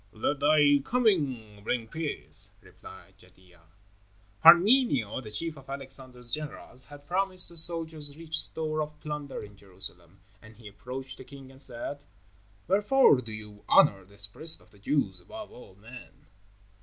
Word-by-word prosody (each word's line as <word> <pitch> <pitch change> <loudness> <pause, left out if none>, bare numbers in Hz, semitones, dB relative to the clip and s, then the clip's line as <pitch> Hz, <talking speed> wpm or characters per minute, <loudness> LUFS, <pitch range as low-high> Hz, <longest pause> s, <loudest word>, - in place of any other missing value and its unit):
"Let 125 +6 -2
thy 145 -1 +5
coming 140 - 0
bring 115 +1 -1
peace," 160 +5 -3
replied 95 +1 -15
Jadua. 90 -1 -20 0.8
Parmenio, 170 - +6
the 110 - -9
chief 155 +9 -3
of 135 - -17
Alexander's 130 -3 -4
generals, 145 -3 0
had 145 +2 -13
promised 185 +2 +1
the 170 - -10
soldiers 160 -3 0
rich 165 -1 -2
store 155 -1 -2
of 150 0 -6
plunder 150 -2 -6
in 105 -1 -12
Jerusalem, 95 -2 -10 0.2
and 110 0 -15
he 115 -2 -12
approached 125 +6 -7
the - - -8
king 135 0 -13
and 135 0 -2
said: 140 +3 -2 0.6
"Wherefore 205 - +4
do 115 -3 -9
you 105 -1 -10
honor 95 -1 +5
this 100 +2 -5
priest 160 +11 +1
of 110 - -23
the 100 - -20
Jews 100 -6 -1
above 215 - -10
all 95 -6 -14
men?" 125 +6 -14
135 Hz, 150 wpm, -28 LUFS, 105-155 Hz, 0.8 s, Parmenio